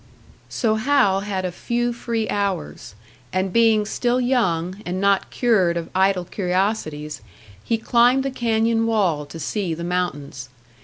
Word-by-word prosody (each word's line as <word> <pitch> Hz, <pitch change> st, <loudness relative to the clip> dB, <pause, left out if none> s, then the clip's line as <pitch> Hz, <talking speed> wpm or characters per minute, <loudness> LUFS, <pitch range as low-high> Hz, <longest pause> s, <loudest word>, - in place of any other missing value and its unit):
So 220 Hz, -3 st, 0 dB
Hal 230 Hz, -5 st, +3 dB
had 195 Hz, -2 st, -3 dB
a 180 Hz, -, -2 dB
few 240 Hz, +6 st, -2 dB
free 230 Hz, -2 st, -2 dB
hours; 200 Hz, -, -3 dB, 0.4 s
and 185 Hz, 0 st, -1 dB
being 225 Hz, -2 st, +4 dB
still 240 Hz, +3 st, 0 dB
young 195 Hz, -7 st, 0 dB
and 180 Hz, +1 st, -3 dB
not 200 Hz, 0 st, +2 dB
cured 190 Hz, -9 st, +2 dB
of 170 Hz, -, -5 dB
idle 190 Hz, -1 st, +2 dB
curiosities, 180 Hz, -6 st, -2 dB, 0.4 s
he 230 Hz, -, 0 dB
climbed 245 Hz, +3 st, +3 dB
the 275 Hz, -, -2 dB
canyon 225 Hz, -2 st, +1 dB
wall 180 Hz, -10 st, +1 dB
to 165 Hz, -, -9 dB
see 175 Hz, +2 st, -2 dB
the 170 Hz, -, -6 dB
mountains. 145 Hz, -7 st, -3 dB
200 Hz, 145 wpm, -22 LUFS, 180-230 Hz, 0.4 s, being